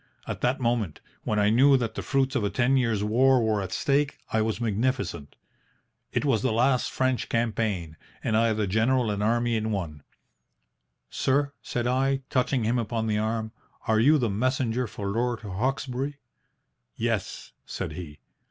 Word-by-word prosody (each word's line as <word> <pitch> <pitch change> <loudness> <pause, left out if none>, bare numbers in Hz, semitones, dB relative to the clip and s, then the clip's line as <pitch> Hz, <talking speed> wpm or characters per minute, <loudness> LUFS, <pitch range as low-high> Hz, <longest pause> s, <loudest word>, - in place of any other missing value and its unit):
At - - -5
that 130 +4 +1
moment, 115 - -1 0.3
when 105 - 0
I 105 0 +3
knew 135 +4 +6
that 115 -3 -2
the - - -4
fruits 135 -1 0
of 120 - +1
a 100 - +1
ten 120 +6 +2
years' 115 -6 +1
war 130 +5 +4
were 110 -3 +1
at 95 -1 -5
stake, 140 0 +1 0.2
I 110 - +3
was 110 +1 -1
magnificent. 110 - -2 0.8
It - - -1
was 125 -7 +2
the - - +1
last 125 +3 +2
French 130 -1 -1
campaign 105 -8 -1 0.3
and 110 - 0
I 115 +1 +3
the 105 -1 0
general 110 +4 +2
and 100 0 -2
army 120 +2 +1
in 110 0 -1
one. 80 -8 -4 1.1
"'Sir," 140 +1 +1
said 120 -1 -3
I, 135 +2 +1
touching 130 -1 +1
him 120 +3 +1
upon 115 0 -2
the 105 -1 0
arm, 110 0 -2 0.4
'are 110 -1 +3
you 145 +7 +5
the 120 -6 0
messenger 125 +2 0
for 100 -1 -7
Lord 120 +3 -1
Hawkesbury?' 130 +6 -2 0.8
"'Yes,' - - -2 0.2
said - - -4
he. 80 -5 -8
115 Hz, 170 wpm, -26 LUFS, 105-130 Hz, 1.1 s, knew